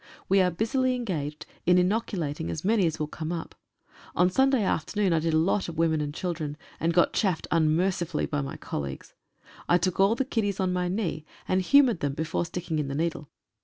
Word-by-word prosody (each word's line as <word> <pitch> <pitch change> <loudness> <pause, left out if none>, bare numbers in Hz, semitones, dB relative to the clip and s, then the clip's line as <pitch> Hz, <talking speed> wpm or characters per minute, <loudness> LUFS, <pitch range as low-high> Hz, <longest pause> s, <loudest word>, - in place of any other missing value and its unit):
We 195 0 +4
are 180 - +3
busily 255 +8 0
engaged 155 - -4 0.2
in 180 0 +6
inoculating 180 - 0
as 85 - -4
many 205 -3 +3
as 160 - -2
will 155 - -1
come 155 +2 -5
up. 170 -2 -5 0.6
On 180 +1 +3
Sunday 265 +1 +3
afternoon 195 +1 0
I 165 - +3
did 160 0 0
a - - +5
lot 180 +4 +1
of 165 - -8
women 160 -2 +2
and 145 -1 -2
children, 155 -3 -4 0.2
and 165 - +1
got 175 0 +3
chaffed 190 -6 0
unmercifully 165 +1 +1
by 145 -1 -2
my 135 - -5
colleagues. 70 -1 -6 0.6
I 175 - +6
took 185 +1 -1
all 195 +4 +5
the 270 - -1
kiddies 205 -6 -1
on 185 -1 +1
my 180 0 0
knee, 175 -5 -2 0.2
and 185 0 +2
humoured 250 -1 +5
them 145 -1 -1
before 160 +2 -1
sticking 170 -2 -3
in 145 - -1
the 140 - -4
needle. 160 -1 -2
175 Hz, 200 wpm, -27 LUFS, 155-195 Hz, 0.6 s, in